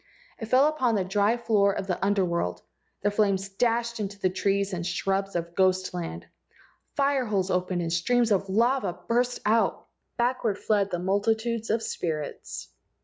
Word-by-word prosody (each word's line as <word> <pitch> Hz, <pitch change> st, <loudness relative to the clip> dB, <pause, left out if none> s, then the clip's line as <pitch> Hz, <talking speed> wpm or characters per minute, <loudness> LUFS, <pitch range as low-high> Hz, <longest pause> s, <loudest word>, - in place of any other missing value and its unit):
It 225 Hz, -, -5 dB
fell 260 Hz, +5 st, +5 dB
upon 260 Hz, -7 st, +1 dB
the 195 Hz, -, +1 dB
dry 205 Hz, +4 st, +2 dB
floor 210 Hz, -4 st, +2 dB
of 195 Hz, -, -3 dB
the 185 Hz, -1 st, -2 dB
Under 200 Hz, -1 st, +2 dB
world. 170 Hz, -, -2 dB, 0.4 s
The 205 Hz, -, +2 dB
flames 200 Hz, -2 st, +1 dB
dashed 235 Hz, +3 st, 0 dB
into 200 Hz, -1 st, -4 dB
the 185 Hz, -2 st, 0 dB
trees 195 Hz, +1 st, 0 dB
and 170 Hz, -1 st, -3 dB
the -, -, -3 dB
shrubs 195 Hz, +2 st, -1 dB
of 170 Hz, 0 st, -3 dB
ghost 185 Hz, 0 st, +2 dB
land. 175 Hz, -2 st, -5 dB, 0.7 s
Fire 275 Hz, -2 st, +2 dB
holes 195 Hz, -3 st, 0 dB
opened 180 Hz, -1 st, 0 dB
and 165 Hz, 0 st, -2 dB
streams 235 Hz, +7 st, +2 dB
of 195 Hz, -1 st, +1 dB
lava 230 Hz, -2 st, +1 dB
burst 245 Hz, +1 st, +1 dB
out. 220 Hz, +2 st, +2 dB, 0.3 s
Backward 240 Hz, -4 st, 0 dB
fled 205 Hz, -2 st, +1 dB
the 175 Hz, -, -2 dB
multitudes 220 Hz, +5 st, 0 dB
of 225 Hz, +1 st, +1 dB
spirits. 155 Hz, -4 st, -4 dB
200 Hz, 170 wpm, -27 LUFS, 185-230 Hz, 0.7 s, fell